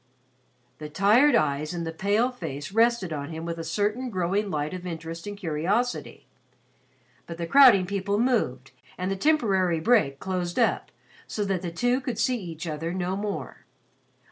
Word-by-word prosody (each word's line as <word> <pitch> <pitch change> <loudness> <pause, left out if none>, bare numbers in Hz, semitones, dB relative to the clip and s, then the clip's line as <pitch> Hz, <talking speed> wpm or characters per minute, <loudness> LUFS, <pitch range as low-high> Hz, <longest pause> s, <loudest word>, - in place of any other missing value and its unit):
The 150 -1 -7
tired 215 - +4
eyes 150 +2 0
in 170 - -3
the 165 - -3
pale 205 +9 +1
face 145 - -6
rested 225 -5 +2
on 145 -1 -5
him 160 0 -6
with 170 0 -4
a - - -4
certain 210 +9 -1
growing 195 +1 -1
light 150 -2 -2
of 180 0 -6
interest 165 +1 -6
and 205 0 -6
curiosity, 195 +8 -2 1.0
but 170 - -7
the 170 - -3
crowding 240 -3 +7
people 200 +1 -1
moved 175 - 0 0.3
and 185 +1 -2
the - - 0
temporary 195 - +2
break 160 - +2
closed 180 -2 -3
up, - - +1 0.4
so 210 - -2
that 195 -3 -1
the 180 - -4
two 245 +10 0
could 250 -4 -4
see 250 -3 0
each 165 -3 -7
other 160 +1 -3
no 185 +1 -2
more. 205 +1 -5
185 Hz, 170 wpm, -26 LUFS, 165-215 Hz, 1.0 s, crowding